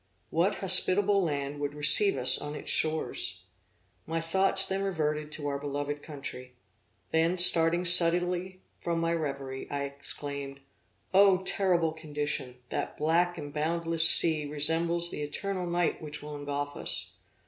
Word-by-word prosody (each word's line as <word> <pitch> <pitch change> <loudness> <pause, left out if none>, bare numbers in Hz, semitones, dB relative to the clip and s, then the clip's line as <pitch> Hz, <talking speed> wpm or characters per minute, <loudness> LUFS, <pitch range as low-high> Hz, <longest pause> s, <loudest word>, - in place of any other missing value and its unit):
What 175 +5 -1
hospitable 195 +1 +4
land 145 -3 -5
would 145 0 -5
receive 150 +5 +7
us 130 0 +4
on 145 0 -8
its - - +1
shores? 155 0 -1 0.6
My 165 +1 -3
thoughts 190 +3 +2
then 190 0 -4
reverted 155 -5 -4
to 150 - -3
our 140 -1 -4
beloved 145 +1 -6
country. 130 -4 -10 0.6
Then 165 +3 0
starting 170 0 +6
suddenly 180 +2 +2 0.2
from 170 -1 -4
my 165 0 -2
reverie, 140 -4 -6
I 140 0 -5
exclaimed: 140 0 -8 0.5
'O 190 -1 +3
terrible 180 -4 0
condition! 150 -5 -6
that - - -6
black 170 +3 -1
and 145 -1 -9
boundless 165 +1 -1
sea 155 -3 +5
resembles 165 +4 +1
the - - -7
eternal 185 +5 -5
night 175 0 -3
which 150 -1 -8
will 150 0 -9
engulf 145 0 -6
us! - - -4
160 Hz, 140 wpm, -27 LUFS, 145-175 Hz, 0.6 s, receive